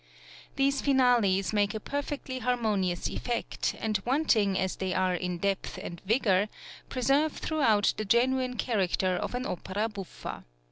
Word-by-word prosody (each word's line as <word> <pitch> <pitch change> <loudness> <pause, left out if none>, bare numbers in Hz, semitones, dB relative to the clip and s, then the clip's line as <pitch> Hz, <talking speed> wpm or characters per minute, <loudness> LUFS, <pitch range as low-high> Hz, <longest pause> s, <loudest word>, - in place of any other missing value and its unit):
These 275 0 +2
finales 240 -8 +3
make 205 0 +1
a - - -2
perfectly 280 0 -4
harmonious 215 -7 0
effect, 240 -1 -2
and 215 -3 -1
wanting 235 -8 +2
as 190 0 -1
they 190 -1 -2
are 185 -1 +2
in 180 0 -2
depth 195 +2 -2
and 170 -1 -7
vigour, 205 -3 +3 0.4
preserve 275 +5 +2
throughout 230 -10 +2
the 215 - -2
genuine 250 +3 +2
character 190 -5 +1
of 215 - -3
an 250 +1 -2
opera 200 +2 -2
buffa. 200 -4 -7
215 Hz, 140 wpm, -29 LUFS, 190-255 Hz, 0.4 s, finales